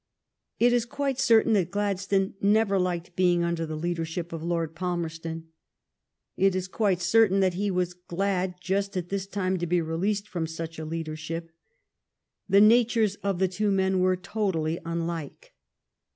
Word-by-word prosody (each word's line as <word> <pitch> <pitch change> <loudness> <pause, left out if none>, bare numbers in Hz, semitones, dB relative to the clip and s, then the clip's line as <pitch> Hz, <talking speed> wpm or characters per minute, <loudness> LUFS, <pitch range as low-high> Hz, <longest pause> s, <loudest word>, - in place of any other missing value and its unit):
It 240 +1 +4
is 240 -1 +2
quite 275 -1 -2
certain 225 -2 +4
that 185 -5 +2
Gladstone 195 -1 0
never 205 -1 +3
liked 180 -1 -2
being 175 -2 +3
under 170 -1 -1
the 155 - -4
leadership 165 +1 -3
of 165 - -5
Lord 165 -1 -2
Palmerston. 165 -2 -4 0.9
It 195 0 +2
is 185 0 -2
quite 195 -2 +1
certain 195 +1 +4
that 185 -2 +2
he 200 +3 -1
was 180 -1 -1
glad 180 +1 -2
just 195 +2 -1
at 175 -1 -3
this 195 -1 -3
time 190 -2 -1
to 175 - -2
be 175 +1 +2
released 190 +6 -1
from 170 -5 -3
such 165 0 -6
a 160 - -5
leadership. 165 +1 -5 1.0
The 200 +1 +6
natures 225 -1 +4
of 200 -2 -2
the 190 +1 +2
two 205 +3 -1
men 190 -1 +2
were 185 0 +3
totally 180 -5 -2
unlike. 170 - -5
185 Hz, 160 wpm, -27 LUFS, 170-200 Hz, 1.0 s, The